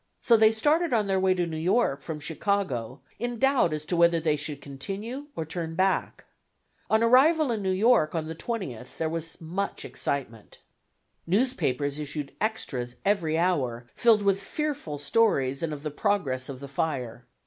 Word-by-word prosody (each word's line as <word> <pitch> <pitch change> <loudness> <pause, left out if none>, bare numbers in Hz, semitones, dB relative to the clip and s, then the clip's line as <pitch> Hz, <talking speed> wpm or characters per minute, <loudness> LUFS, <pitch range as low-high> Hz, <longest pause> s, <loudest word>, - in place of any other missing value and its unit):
So 235 - +4
they 220 -1 +6
started 300 +8 +2
on 220 -3 +2
their 195 -1 +1
way 185 0 +3
to 175 -1 0
New 160 -2 -4
York 175 - +1
from 155 +1 -5
Chicago 150 - -2 0.2
in 240 +1 -3
doubt 270 - +3
as 155 0 -4
to 175 - -1
whether 170 0 +4
they 155 -2 +1
should 150 -1 -4
continue 200 - -6
or 160 - -3
turn 165 0 -4
back. 190 +2 0 0.6
On 220 +1 +3
arrival 275 +5 +5
in 220 -3 -1
New 190 - -1
York 190 -4 +3
on 160 -1 -1
the 160 - -5
20th 160 - -5
there 160 - 0
was 165 0 -5
much 180 +5 -4
excitement. 115 -6 -4 0.7
Newspapers 155 - 0
issued 145 -1 -5
extras 130 - -2
every 175 -6 +1
hour, 130 -9 0
filled 225 -3 +4
with 195 0 +2
fearful 285 - -3
stories 140 - +2
and 165 -2 -2
of 150 -1 -6
the 150 - -3
progress 140 -7 -1
of 135 -1 -7
the 140 - -7
fire. 130 -6 -3
170 Hz, 170 wpm, -27 LUFS, 145-220 Hz, 0.7 s, they